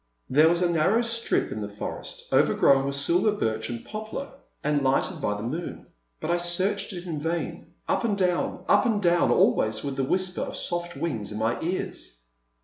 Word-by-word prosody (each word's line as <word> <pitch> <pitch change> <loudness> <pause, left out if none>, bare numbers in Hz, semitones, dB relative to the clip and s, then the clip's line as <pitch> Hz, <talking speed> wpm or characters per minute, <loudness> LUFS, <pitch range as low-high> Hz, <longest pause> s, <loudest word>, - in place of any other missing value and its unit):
There 155 +4 +6
was 175 +1 +2
a 175 - +2
narrow 190 +9 +3
strip 230 0 +1
in 110 - -4
the 105 - -4
forest, 100 0 -6
over - - +4
grown 135 -1 +4
with 140 0 -1
silver 175 +9 +3
birch 110 - -2
and 120 -1 -6
poplar 220 +6 -6 0.3
and 150 -1 +1
lighted 140 +5 +1
by 105 -5 -1
the 105 - -6
moon, 160 +9 -5 0.3
but - - -2
I 175 - +3
searched 185 +4 0
it 180 -2 -7
in 160 -4 -3
vain, 165 +3 -3 0.2
up - - +1
and 215 -3 +1
down, 180 -2 0
up - - +4
and 220 -3 +1
down, 175 -3 +3
always 110 0 +2
with 140 -1 -4
the 135 - +1
whisper 185 +6 0
of - - -4
soft 175 0 -3
wings 115 -12 -3
in 105 - -5
my 110 +2 0
ears. 170 - -4
170 Hz, 200 wpm, -26 LUFS, 135-185 Hz, 0.3 s, There